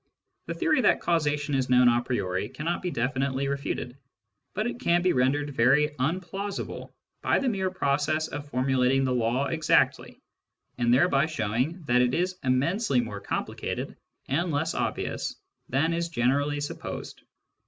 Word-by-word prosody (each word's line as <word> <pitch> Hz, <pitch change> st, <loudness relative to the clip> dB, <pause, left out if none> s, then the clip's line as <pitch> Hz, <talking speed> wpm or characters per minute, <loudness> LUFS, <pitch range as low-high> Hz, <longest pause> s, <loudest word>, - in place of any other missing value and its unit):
The -, -, -3 dB
theory 310 Hz, -6 st, +2 dB
that -, -, +4 dB
causation 150 Hz, -3 st, 0 dB
is 130 Hz, -2 st, 0 dB
known 125 Hz, 0 st, +6 dB
a 120 Hz, 0 st, +4 dB
priori 100 Hz, -5 st, -2 dB
cannot 165 Hz, +6 st, -3 dB
be 180 Hz, -, -2 dB
definitely 130 Hz, +1 st, -1 dB
refuted, 135 Hz, -2 st, -3 dB, 0.6 s
but 215 Hz, +3 st, 0 dB
it 240 Hz, 0 st, -3 dB
can 175 Hz, -7 st, +2 dB
be 180 Hz, -, +3 dB
rendered 145 Hz, +3 st, +1 dB
very 135 Hz, +4 st, +4 dB
unplausible 185 Hz, +7 st, -3 dB, 0.3 s
by -, -, +2 dB
the 275 Hz, -, 0 dB
mere 190 Hz, -5 st, 0 dB
process 155 Hz, -2 st, 0 dB
of 145 Hz, 0 st, -7 dB
formulating 130 Hz, 0 st, +2 dB
the 130 Hz, -1 st, +1 dB
law 120 Hz, +3 st, +1 dB
exactly, 160 Hz, +1 st, +1 dB, 0.6 s
and 120 Hz, 0 st, +2 dB
thereby 140 Hz, +2 st, +4 dB
showing 130 Hz, -, -2 dB
that 125 Hz, -3 st, +3 dB
it 125 Hz, 0 st, +2 dB
is 180 Hz, +1 st, -1 dB
immensely 140 Hz, -, +1 dB
more 105 Hz, -4 st, -4 dB
complicated -, -, -4 dB, 0.3 s
and 170 Hz, +6 st, 0 dB
less 145 Hz, -2 st, 0 dB
obvious -, -, -2 dB, 0.3 s
than 150 Hz, +6 st, +1 dB
is 170 Hz, 0 st, -1 dB
generally 145 Hz, +1 st, +1 dB
supposed. 145 Hz, -, -6 dB
140 Hz, 150 wpm, -27 LUFS, 125-170 Hz, 0.6 s, known